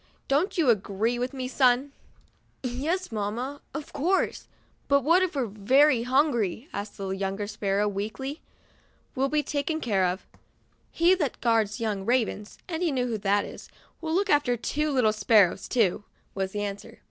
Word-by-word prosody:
Don't 305 +9 +1
you 300 -8 +5
agree 220 +3 -1
with 250 +1 -2
me, 260 -2 -4
son 260 +1 +2 0.4
?' - - -40
"Yes, 290 +9 -2
mamma, 230 +7 -3
of 305 -2 -7
course; 365 +7 0 0.4
but 280 0 +4
what 335 +6 +4
if 370 -4 -1
we're 265 -3 +1
very 240 +6 +3
hungry?" 250 - +1
asked 205 +1 -5
the 195 -1 -4
younger 195 +1 -2
sparrow, 205 -1 0
weakly. 220 - -4 0.4
" - - -37
We'll 270 +1 +1
be 300 0 +1
taken 295 +2 -2
care 195 -9 +1
of. 180 +2 -3 0.6
He 340 +2 +4
that 315 -8 -1
guards 225 -3 +1
the - - -4
young 205 -3 -1
ravens 220 -2 -1
— - - -41
and 335 -2 -4
you 345 -3 +1
know 255 -2 0
Who 230 -3 -2
that 200 0 +1
is - - -10 0.2
— - - -35
will 320 0 -2
look 395 +1 +1
after 285 -5 +3
two 300 +6 -1
little 250 -6 +3
sparrows, 205 -3 +3
too," 210 -4 +1 0.3
was 190 -1 -2
the 205 0 -3
answer. 200 0 -6
245 Hz, 180 wpm, -27 LUFS, 205-285 Hz, 0.6 s, you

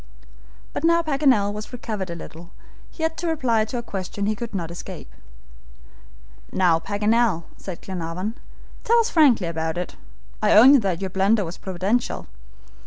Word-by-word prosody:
But - - -4
now 335 0 +4
Paganel 270 -9 +2
was 210 0 -7
recovered 215 -6 -5
a 170 - -4
little, 170 +1 -10 0.4
he 320 - -7
had 320 0 0
to 350 - -3
reply 245 -9 +1
to 230 +3 -5
a 235 - -4
question 195 -1 -4
he 215 +1 0
could 225 0 -6
not 170 -3 -3
escape. 170 - -9 1.4
"Now, 175 -3 +3
Paganel," 210 -1 +1
said 185 -3 -8
Glenarvan, 180 +3 -4 0.5
"tell 470 - +4
us 465 0 +2
frankly 275 - +5
all 165 - -2
about 160 0 -3
it. 180 - -5 0.4
I - - +4
own 265 +6 +8
that 190 -5 -1
your 190 -1 -3
blunder 200 +2 +2
was 170 +2 -8
providential. 190 +6 -1
205 Hz, 165 wpm, -23 LUFS, 180-245 Hz, 1.4 s, own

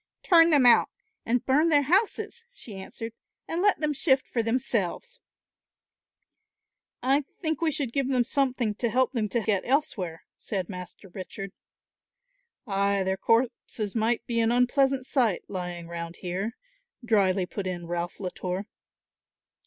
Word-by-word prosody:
"Turn 335 -2 +6
them 290 -5 +5
out 240 - +7 0.4
and 240 +1 +1
burn 295 +5 +3
their 290 -2 +4
houses," 395 - +1
she 240 - -11
answered, 225 +4 -7 0.3
"and 335 +2 -2
let 410 -4 +3
them 300 -1 +1
shift 265 -1 +2
for 235 - -1
themselves." 230 -5 -1 1.8
"I 275 +3 +3 0.2
think 315 -3 -2
we 325 -1 +2
should 270 -5 -2
give 275 -2 0
them 255 -2 +3
something 255 -3 0
to 235 +3 -1
help 255 +3 +2
them 225 -5 -1
to 235 - 0
get 205 -3 +1
elsewhere," 230 - -1
said 190 -4 -4
Master 180 +1 -9
Richard. 195 +1 -7 1.1
"Ay, 200 -2 +1
their 190 0 0
corpses 230 -1 0
might 230 +1 0
be 235 -1 -1
an 225 0 +3
unpleasant 260 +2 +2
sight, 240 -9 +1
lying 180 -2 -5
round 170 0 -6
here," 190 +6 -4 0.5
dryly 195 -5 +2
put 195 +1 -5
in 175 -2 -4
Ralph 175 +1 -4
Latour. 185 0 -4
230 Hz, 145 wpm, -27 LUFS, 190-270 Hz, 1.8 s, out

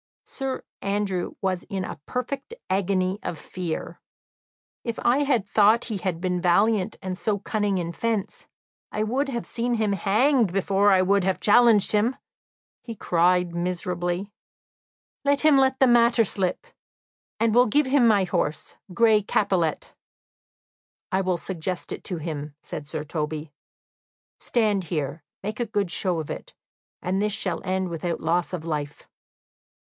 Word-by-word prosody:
Sir 270 -2 -4 0.2
Andrew 195 -3 -2
was 185 -2 0
in 190 -2 -3
a - - -7
perfect 275 - -4 0.2
agony 190 0 +1
of 165 - -4
fear. 170 +1 -5 0.8
"If 230 -2 -3
I 275 +2 +3
thought 210 +3 +4
he - - -1
had 185 -3 -2
been 180 0 -1
valiant 200 +3 +2
and 185 -1 -3
so 205 +2 -1
cunning 205 -1 -1
in 170 -1 -2
fence, 225 0 -3 0.4
I 215 - -1
would 265 +6 0
have 235 -3 -3
seen 240 +1 -1
him 215 -3 +1
hanged 220 +3 +2
before 195 +2 +2
I 185 -1 +5
would 200 +1 +3
have 190 0 0
challenged 220 -1 +5
him!" 215 +5 +2 0.7
he 230 - -7
cried 180 -1 +2
miserably. 175 +2 -2 0.9
"Let 285 0 +2
him 305 -3 +5
let 265 0 +2
the 265 - +6
matter 235 -1 +5
slip, 190 - -2 0.7
and 225 -1 +2
will 245 +2 +5
give 290 +7 +3
him 260 -2 +4
my 205 -3 +4
horse, 160 -4 -2 0.2
Gray 220 -2 +5
Capilet." 190 -6 0 1.2
"I 190 - +2
will 185 -2 0
suggest 180 0 -4
it - - -6
to 180 - -3
him," 150 -2 -5
said 150 -2 -7
Sir 155 0 -4
Toby. 150 0 -4 0.9
"Stand 210 -5 +1
here, 150 -1 -3 0.2
make 210 +3 -4
a 240 - +1
good 200 -4 -1
show 180 -1 0
of 155 - -5
it; - - -8 0.5
this 195 +3 0
shall 220 - -1
end 190 -1 -1
without 170 +1 -3
loss 170 +2 0
of 175 -3 -5
life." 150 -3 -4
195 Hz, 150 wpm, -25 LUFS, 175-225 Hz, 1.2 s, the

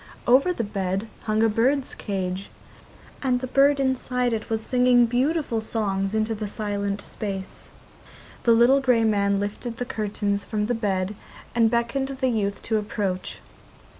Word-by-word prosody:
Over 265 +8 +5
the 335 - -2
bed 195 0 -2 0.2
hung 215 0 +2
a - - +5
bird's 255 +6 +1
cage, 190 -1 -4 0.7
and 255 -2 +1
the 255 - -4
bird 275 +2 +4
inside 250 -2 0
it 220 -1 -4
was 220 -1 -1
singing 250 -1 +4
beautiful 250 0 0
songs 200 -2 -1
into 220 +1 +1
the 215 -1 -4
silent 205 -1 -2
space. 195 -2 -6 0.7
The 235 - +3
little 245 +4 +5
grey 250 -4 +3
man 200 -2 +2
lifted 210 +3 -4
the 245 - -3
curtains 205 -2 -2
from 210 -2 -2
the 245 - 0
bed 200 -3 -1 0.4
and 230 -1 +4
beckoned 235 +4 0
the 265 -1 -1
youth 200 -4 -1
to 220 -1 +1
approach. 200 -3 -3
225 Hz, 155 wpm, -24 LUFS, 205-250 Hz, 0.7 s, Over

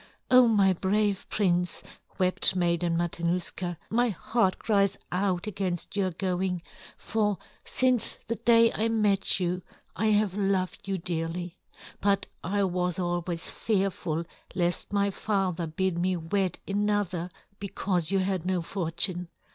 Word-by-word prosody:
"Oh, 255 -1 +8
my 200 -4 +4
brave 200 +2 0
prince," 180 -4 0 0.3
wept 185 0 +5
Maiden 170 -1 +1
Matanuska, 175 +1 -1
"my 240 +2 +3
heart 210 0 0
cries 200 -3 +1
out 185 -1 0
against 195 -3 -2
your 195 -2 +1
going, 180 0 -2 0.3
for 210 -3 0 0.3
since 255 -3 +1
the 230 - -1
day 230 -1 +5
I 220 - 0
met 205 -4 +2
you 180 0 -1 0.3
I 220 - +1
have 210 -2 +3
loved 195 -2 -1
you 195 -1 -1
dearly; 170 0 -3 0.5
but 200 -1 +2 0.2
I 200 +4 0
was 180 -2 0
always 175 -1 -2
fearful 190 -6 -1 0.3
lest 175 -1 -1
my 200 0 +2
father 190 -5 -1
bid 170 +2 -1
me 180 +1 +1
wed 180 +2 -1
another 200 -4 0 0.3
because 190 -4 0
you 195 - +2
had 190 -2 0
no 180 -1 0
fortune. 175 0 -1
185 Hz, 130 wpm, -28 LUFS, 175-205 Hz, 0.5 s, Oh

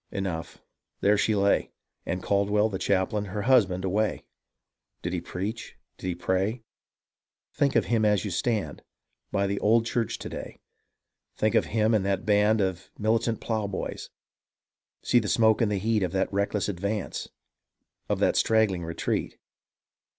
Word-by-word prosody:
Enough! 90 -5 -4 0.4
there 105 +1 +4
she 110 +1 +2
lay. 100 0 +2 0.4
And 90 +1 -2
Caldwell, 105 +2 +2
the 95 -3 -4
chaplain, 100 +2 0
her 100 +1 -4
husband 100 -7 +3
away! 105 +3 0 0.8
Did 90 - -2
he 90 - -1
preach? 100 +6 -5 0.2
Did - - -5
he 90 - -1
pray? 95 +6 -1 0.9
Think 140 -2 +1
of - - +3
him 115 -2 +1
as 105 -1 +2
you 100 - -3
stand 110 +3 -1 0.5
By 100 0 +1
the 100 0 -1
old 115 +2 +3
church 120 -2 -1
to - - -7
day; - - -8 0.8
think 110 -1 +1
of - - +3
him 110 0 +1
and 105 -3 +2
that 95 -1 -1
band 105 +1 +3
Of 95 -1 -2
militant 110 +1 0
ploughboys! 105 -4 -3 0.9
See 120 - +4
the 110 - -3
smoke 110 +1 +3
and 110 -2 +2
the 100 - +1
heat 110 +2 +1
Of 90 -2 -1
that 95 +1 0
reckless 100 +1 0
advance 100 +1 -3 0.4
— - - -50
of - - +1
that - - +2
straggling 110 -6 +2
retreat 85 0 -2
105 Hz, 160 wpm, -27 LUFS, 95-110 Hz, 0.9 s, there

